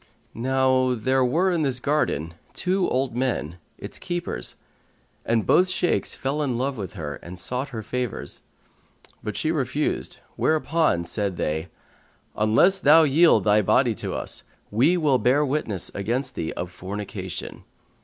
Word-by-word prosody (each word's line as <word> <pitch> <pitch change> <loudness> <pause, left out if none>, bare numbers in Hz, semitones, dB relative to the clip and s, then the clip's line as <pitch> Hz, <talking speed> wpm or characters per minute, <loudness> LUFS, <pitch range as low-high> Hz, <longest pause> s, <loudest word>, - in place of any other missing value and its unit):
Now 130 +1 +2
there 130 +3 +1
were 170 +10 +2
in 170 -2 +1
this 135 -4 0
garden 100 - 0 0.2
two 185 0 0
old 130 -1 -1
men, 115 - -2 0.2
its - - -8
keepers, 175 - -3 0.7
and 115 -1 +2
both 185 +1 +4
Shaykhs 185 -1 0
fell 140 +3 -2
in 130 -5 -1
love 135 +2 -1
with 100 -6 -6
her 75 -7 -5
and 90 +1 -10
sought 125 - -2
her 110 -4 -6
favours; 125 +1 -4 0.8
but 105 - -4
she 155 - 0
refused, 145 -1 -2 0.2
whereupon 155 - +1
said 100 0 -2
they, 80 +3 -2 0.7
"Unless 115 - +4
thou 160 0 +7
yield 160 +4 +5
thy 105 0 +4
body 100 - +3
to - - -5
us, - - -5 0.3
we 130 - +3
will 145 -6 +3
bear 140 +4 +3
witness 130 - -2
against 120 +7 -2
thee 80 - -3
of 90 - -5
fornication." 100 +3 -6
130 Hz, 145 wpm, -24 LUFS, 105-150 Hz, 0.8 s, thou